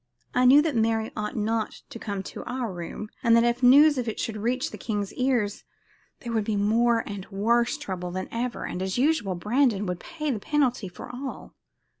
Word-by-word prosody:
I 250 - +3
knew 280 +4 +8
that 315 -5 -1
Mary 225 0 +1
ought 210 -1 -3
not 220 0 -2
to 230 - -7
come 200 -3 -4
to - - -8
our 245 -5 -3
room, 175 +5 -6
and 230 -3 +5
that 230 - +5
if 240 +1 +1
news 280 +3 +7
of 245 - -3
it 220 - -3
should 225 - -2
reach 245 +4 -1
the - - -7
king's 205 -3 -3
ears 245 -6 0 0.6
there 235 - -5
would 220 -2 +1
be 210 0 -1
more 225 +3 +2
and 200 -2 -6
worse 235 +7 +1
trouble 185 -10 -5
than 185 +1 -4
ever, 235 +1 -3
and, 180 - -4
as 190 +2 -2
usual, 255 - +1
Brandon 210 +2 +1
would 180 -2 -3
pay 305 -3 -4
the 225 - -2
penalty 255 -4 0
for 180 - -10
all. 265 +1 -7
230 Hz, 205 wpm, -26 LUFS, 205-250 Hz, 0.6 s, knew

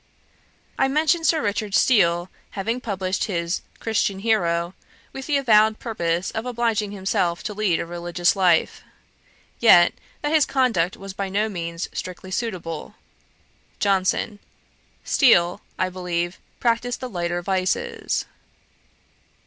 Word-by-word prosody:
I 270 - +4
mentioned 315 +4 +2
Sir 320 -2 +2
Richard 205 -1 -1
Steele 175 -7 +3 0.3
having 230 +6 -2
published 190 -4 -2
his 170 -3 -2 0.2
Christian 210 -3 0
Hero, 175 -5 +1 0.4
with 270 0 -7
the 295 -2 +2
avowed 220 -4 +4
purpose 175 -5 -2
of 220 - -3
obliging 235 -4 -1
himself 190 -3 -1
to 210 - -4
lead 200 -5 +1
a - - -2
religious 175 +1 0
life, 180 -4 +2 0.8
yet, 175 -7 +7 0.3
that 295 +1 0
his 310 -2 +4
conduct 230 -10 +1
was 195 0 -8
by 195 0 -3
no 210 +3 0
means 170 -3 -4
strictly 185 +1 -6
suitable. 185 -4 -4 0.8
JOHNSON. 200 +1 +1 0.6
'Steele, 175 - +4 0.2
I 185 - +1
believe, 175 -1 -3 0.2
practised 240 0 0
the 255 - -4
lighter 175 -4 -3
vices.' 190 0 -1
195 Hz, 125 wpm, -23 LUFS, 175-230 Hz, 0.8 s, yet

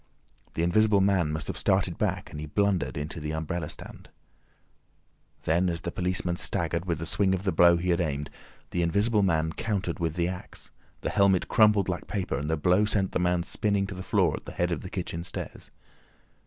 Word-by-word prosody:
The 80 - 0
Invisible 105 +4 +4
Man 95 -5 +2
must 80 0 -3
have - - -4
started - - +1
back, - - -1
and 75 - -7
he 80 - -5
blundered 100 0 0
into 75 +3 -4
the 75 0 -4
umbrella 80 0 -3
stand. - - -9 1.3
Then, 85 +3 +2
as 85 -1 -3
the - - -4
policeman 90 -1 -1
staggered 85 0 -1
with 85 -3 -1
the 80 - -5
swing 95 +2 +2
of 95 - -5
the 95 - +1
blow 85 +1 +6
he 90 +1 0
had 85 - +2
aimed, 75 -3 -2 0.4
the 90 - 0
Invisible 100 +6 +2
Man 80 -4 +1
countered 100 -5 -2
with 80 -2 -1
the 85 -1 +1
axe, 90 0 -7 0.3
the - - -2
helmet 100 -3 +3
crumpled 105 -4 +4
like 90 -2 -3
paper, 95 -3 -2
and 75 +2 -3
the 80 - +1
blow 90 +7 +3
sent 100 -3 0
the - - 0
man 90 -1 +1
spinning 100 +1 0
to 95 - -6
the 95 - -7
floor - - +2
at - - -12
the - - -7
head 90 0 0
of 80 - -2
the 90 - -7
kitchen 85 -3 -4
stairs. 90 - -7
90 Hz, 210 wpm, -27 LUFS, 85-95 Hz, 1.3 s, blow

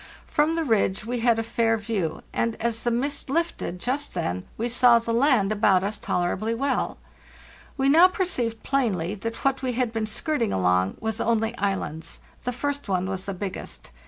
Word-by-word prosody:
From 305 +2 +1
the 330 - 0
ridge 215 -6 +1
we 245 +1 -2
had 230 -1 +3
a 225 - 0
fair 225 0 +1
view, 205 -6 -2
and, 230 -1 0
as 230 0 -2
the 240 - 0
mist 275 +4 -2
lifted 330 - -1
just 275 +5 -2
then, 90 - -2
we 230 - -1
saw 245 0 +5
the 230 0 -2
land 235 -5 +3
about 200 -3 +3
us 205 +2 -3
tolerably 190 +6 -1
well. 275 +3 -1 0.8
We 270 0 +2
now 325 +6 +8
perceived 245 - -2
plainly 205 -10 0
that 230 +5 -6
what 270 -1 +2
we 255 -2 -1
had 240 -1 0
been 220 -1 -1
skirting 240 +1 -1
along 90 0 +1
was 220 0 -2
only 225 0 +1
islands. 185 -5 -3 0.2
The 250 - 0
first 285 0 -3
one 185 -1 +1
was 190 0 -4
the 195 - -4
biggest. 190 - -6
230 Hz, 185 wpm, -25 LUFS, 195-255 Hz, 0.8 s, now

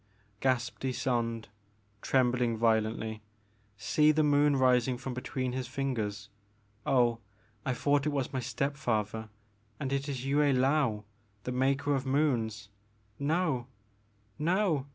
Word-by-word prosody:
gasped 125 -3 0
Ysonde, 120 -3 -1 0.6
trembling 125 -3 +2
vio 110 -1 +4
lently, 110 0 -4 0.3
'* - - -37 0.2
see 150 +7 +3
the 155 0 +2
moon 145 0 +4
rising 125 -1 +3
from 130 0 -5
between 130 0 -3
his 130 -1 -3
fingers! 115 -6 -3 0.6
Oh 120 -3 +3 0.5
I 130 - +1
thought 145 +2 +1
it - - +1
was 140 -2 -2
my 130 - 0
step 140 +3 -2
father 110 -3 -2 0.5
and 135 -1 -2
it 140 +1 -1
is 130 -2 -4
Yue 140 +1 +1
I^aou 135 -5 +2 0.4
the 125 - -3
Maker 135 +3 +1
of 135 -1 -1
Moons 115 -8 0 0.3
— 105 -1 -38
no! 150 -4 0 0.7
no 165 -3 +1
130 Hz, 135 wpm, -30 LUFS, 115-140 Hz, 0.7 s, vio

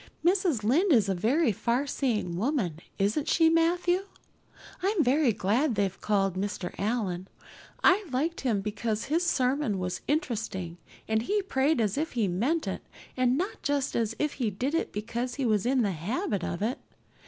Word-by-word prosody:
Mrs. 355 - +2
Lynde 325 - +3
is 215 -6 +4
a - - +2
very 235 - +2
farseeing 235 -4 -1
woman, 200 - -1 0.2
isn't 210 +10 0
she, 325 -1 +4
Matthew? 350 +3 +2 0.8
I'm 385 -2 +2
very 275 0 +3
glad 225 +7 +1
they've 195 -1 -1
called 195 -3 +1
Mr. 190 -2 -3
Allan. 195 -4 -1 0.6
I 390 +3 +5
liked 310 +6 -1
him 225 -7 +1
because 215 +2 -2
his 325 +5 +1
sermon 260 - +1
was 180 -1 -3
interesting 220 - -2 0.3
and 220 0 +1
he 405 - 0
prayed 280 -5 +1
as 215 +3 +1
if 320 - -2
he 230 -5 +1
meant 245 - 0
it - - -3 0.3
and 255 0 +2
not 370 +6 -3
just 285 -2 -1
as 225 -1 0
if 300 -1 0
he 230 - +2
did 250 +9 -2
it 330 - 0
because 235 +4 -3
he 275 - -1
was 215 -1 +2
in 255 -1 +3
the 200 - +1
habit 200 - -2
of 175 +4 -3
it. 235 +4 -1
240 Hz, 170 wpm, -28 LUFS, 205-300 Hz, 0.8 s, I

